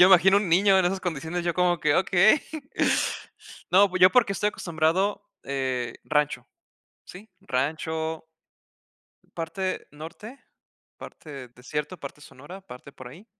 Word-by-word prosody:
yo 180 - +10
imagino 190 +1 +6
un 200 -4 -3
niño 190 +3 +5
en 185 - +3
esas 190 +2 -1
condiciones 175 0 -4
yo 170 - +1
como 175 -1 +1
que: 150 -1 +2
"Okey". 190 +8 +4 1.3
No, 195 +2 +5
pues, 185 - -3
yo 185 - +9
porque 230 -3 +3
estoy 205 +1 0
acostumbrado, 180 +3 0 0.2
eh, 130 -3 -2
rancho, 150 -1 0 0.6
¿sí? 200 +5 -12
Rancho 160 +4 -2 1.1
parte 185 +3 -4
norte, 165 - -10 0.6
parte 140 -5 -10
desierto, 150 +7 -5
parte 140 +1 -9
sonora, 145 +7 -12
parte 140 -6 -12
por 130 - -11
ahí. 165 - -13
170 Hz, 135 wpm, -25 LUFS, 150-190 Hz, 1.3 s, yo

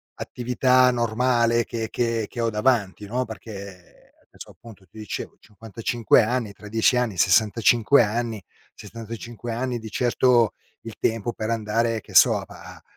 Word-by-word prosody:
attività 125 +1 +2
normale 120 0 +1
che 115 -2 -5
che 115 -3 -1
che 120 - -5
ho 115 - +1
davanti, 105 -3 0
no, 125 +4 -2
perché 100 -5 -11 0.2
adesso, - - -13
appunto, 110 -5 -16
ti 95 - -19
dicevo, 105 - -7
55 115 +3 0
anni, 115 -1 -2
tra 105 - -13
10 110 +4 +2
anni, 120 -6 -1
65 110 - +4
anni, 115 0 -3 0.3
65 115 +2 -8
anni, 120 +1 -3
di 110 -1 -9
certo, 120 -1 +2 0.3
il 115 -1 -9
tempo 115 +1 -1
per 110 - -5
andare, 115 0 -1
che - - -16
so, - - +6
a - - -6
pa - - -14
a - - -19
115 Hz, 155 wpm, -23 LUFS, 110-120 Hz, 0.3 s, so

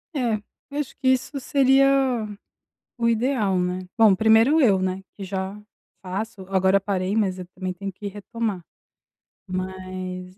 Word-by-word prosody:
É, 235 -6 0 0.4
acho 295 - -4
que 265 - -2
isso 260 +2 +1
seria 275 0 +4 1.1
o 235 0 +2
ideal, 225 -5 +1
né. 180 +1 -2
Bom, 220 -3 +7
primeiro, 225 +9 +5
eu, 205 -8 +5
né, 185 0 -2
que 200 - -6
já 190 +1 -4 0.4
faço. 195 +2 -5
Agora 190 0 +3
parei, 195 0 -1
mas 190 -4 +1
eu 180 - -7
também 185 -1 -3
tenho 195 +2 -6
que 205 +3 -9
retomar. 205 -1 -4 0.9
Mas, 185 0 -5
195 Hz, 140 wpm, -24 LUFS, 185-230 Hz, 1.1 s, Bom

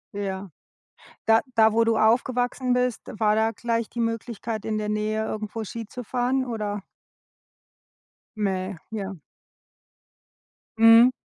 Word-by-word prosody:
Ja. 195 -1 -4 0.8
Da 225 0 +5
da, 220 -1 +5
wo 230 0 +4
du 225 -1 +2
aufgewachsen 245 +3 +2
bist, 250 -2 0 0.2
war 210 -1 +3
da 220 +1 +2
gleich 230 0 -2
die 240 - -7
Möglichkeit, 230 -1 -3
in 215 -1 -2
der 210 0 -2
Nähe 215 +1 -1
irgendwo 215 +1 -4
Ski 230 +2 -6
zu 250 +4 -8
fahren, 255 +2 0
oder? 210 -3 -3 1.6
Mä 190 -2 -1 0.2
ja. 200 -3 -4 1.6
Mhm. 225 +2 +8
225 Hz, 125 wpm, -25 LUFS, 210-235 Hz, 1.6 s, Mhm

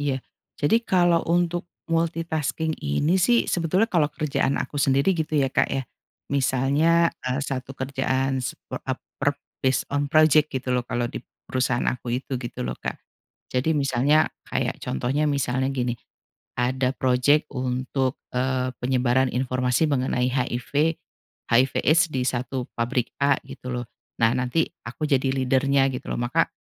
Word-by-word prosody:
iya. 140 -2 0 0.4
Jadi 225 +11 +3
kalau 175 -4 +3
untuk 175 0 +1 0.2
multitasking 165 -1 0
ini 145 - +1
sih 235 +6 +4
sebetulnya 175 +4 +1
kalau 165 -6 +3
kerjaan 150 -2 -1
aku 145 - -3
sendiri 140 +8 +3
gitu 160 -2 -2
ya 135 -2 +2
Kak - - +2
ya 135 0 -1 0.5
misalnya, 140 +5 +3
eee, 130 +2 -1
1 135 0 -5
kerjaan 130 0 -1
sep 125 - -4 0.3
ap - - 0 0.2
per - - +1 0.2
based 130 -1 +1
on 145 0 +1
project 155 0 +5
gitu 130 -1 -2
loh 125 - +2
kalau 120 0 -1
di - - -5 0.3
perusahaan 130 -1 0
aku 125 -1 -2
itu, 135 0 -6
gitu 120 - -5
loh, - - -2
Kak. - - -4 0.5
Jadi 145 +5 +1
misalnya 140 +3 +3 0.2
kayak - - -2
contohnya 140 - 0
misalnya 130 -1 0
gini, 125 -3 -1 0.6
ada 125 +1 +1
projek 130 +4 +3
untuk, 130 0 -1 0.2
eee, 130 0 0
penyebaran 130 0 +2
informasi 125 +3 +1
mengenai 125 -2 +1
HIV, 135 +5 0 0.6
HIV 130 +3 +4
AIDS 165 +2 +4
di 130 -2 -1
satu 125 0 -2
pabrik 120 +1 -1
a 140 0 +4
gitu 125 - -9
loh, 120 0 -3 0.4
nah 115 0 +4
nanti 125 +6 +1 0.2
aku 125 +6 -4
jadi 135 -2 +2
leader-nya 135 +1 +2
gitu 125 - -6
loh - - -2
maka 120 0 +1
135 Hz, 150 wpm, -24 LUFS, 125-155 Hz, 0.6 s, project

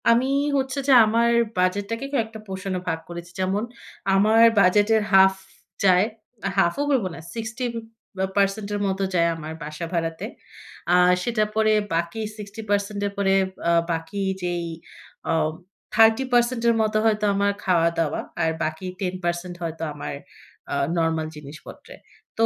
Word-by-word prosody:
আমি 235 +2 +4 0.3
হচ্ছে 265 +1 -1
যে 275 - +6
আমার 230 +2 +2 0.3
বাজেটটাকে 205 +7 0
কয়েকটা 225 -4 -2
পোষণে 190 -1 -4
ভাগ 165 -1 -1
করেছি। 170 0 -8
যেমন 190 +3 0 0.5
আমার 215 +3 +4 0.2
বাজেটের 205 +4 +4
হাফ 190 0 +7 0.5
যায় 185 0 +5 0.5
হাফও 195 +9 +2
বলব 255 -8 +2
না, - - -9 0.2
60% 220 -4 -3
বে - - -4
এর - - -2
মতো 190 0 -1
যায় 170 -1 +3
আমার 160 0 -7
বাসা 155 +3 -5
ভাড়াতে। 165 +2 -2 0.7
আর 180 0 +5
সেটার 215 -3 0
পরে 215 0 +3 0.2
বাকি 170 +6 -2 0.2
60% 205 -1 -3
এর - - -5
পরে 195 -1 +2 0.4
আ - - +4 0.2
বাকি 165 +5 -3 0.2
যেই 175 -1 -2 0.6
আ - - +3 0.6
30% 240 +2 +4
এর 235 - +4
মতো 215 0 +1
হয়তো 215 -1 +2
আমার 200 0 +2
খাওয়া-দাওয়া 165 -3 +1 0.2
আর 160 - +2
বাকি 155 +4 -3 0.2
10% 180 -1 -3
হয়তো 165 -1 -4
আমার 145 - -6 0.6
আ - - 0 0.2
নরমাল 160 -1 0
জিনিসপত্রে। 150 +1 -11 0.4
তো 225 - +5
195 Hz, 135 wpm, -23 LUFS, 170-220 Hz, 0.7 s, হাফ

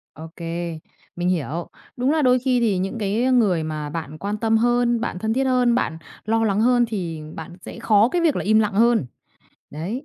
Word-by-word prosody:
Ô 160 +2 -9
kê. 170 -1 -4 0.4
Mình 175 +1 -1
hiểu. 170 -1 -2 0.3
Đúng 250 +2 +1
là 310 0 +2
đôi 255 -1 +4
khi 255 -1 +1
thì 215 -5 +1
những 195 +5 -3
cái 205 +2 -1
người 200 -10 +3
mà 155 -1 -4
bạn 155 -1 -6
quan 205 +1 -3
tâm 225 +1 +1
hơn, 240 0 +2
bạn 200 -6 -3
thân 220 +3 -1
thiết 265 +3 +1
hơn, 250 -2 +2
bạn 160 -10 -1 0.3
lo 225 +1 +1
lắng 205 -1 +1
hơn 245 +1 +4
thì 175 -7 -4
bạn 165 +2 -8
sẽ - - -9
khó 220 -1 +4
cái 345 +6 0
việc 320 -4 +2
là - - -2
im 215 +2 +4
lặng 210 -2 +1
hơn. 230 - +3 0.6
Đấy, 190 - -5
215 Hz, 215 wpm, -22 LUFS, 175-240 Hz, 0.6 s, đôi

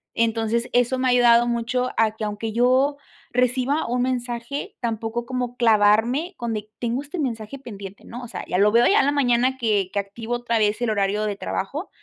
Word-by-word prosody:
Entonces 230 +1 0
eso 245 +1 +2
me 260 - +1
ha - - +4
ayudado 240 -1 +5
mucho 240 +2 -1
a 220 -1 +2
que 220 - -3
aunque 210 +1 -4
yo 255 +5 +2 0.3
reciba 250 +4 +1
un 245 +1 0
mensaje 245 +1 -3
tampoco 230 0 -3
como 250 -1 -3
clavarme 230 - +3
con 235 -1 -3
de: 210 -1 -5
"Tengo 240 +2 -1
este 295 +5 -7
mensaje 235 -2 -3
pendiente", 200 -6 -10
¿no?, 245 +2 -8
o - - -7
sea, - - -6
ya 180 - -1
lo 205 +2 +4
veo 235 +1 +5
a 400 - +4
la 285 - +2
mañana 255 -1 +2
que 210 -6 0
que 205 - +1
activo 220 +4 -5
otra 240 -1 -1
vez, 210 +2 +1
el 240 - +1
horario 205 0 0
de 205 -1 -2
trabajo, 280 - -4
235 Hz, 200 wpm, -23 LUFS, 220-250 Hz, 0.3 s, ayudado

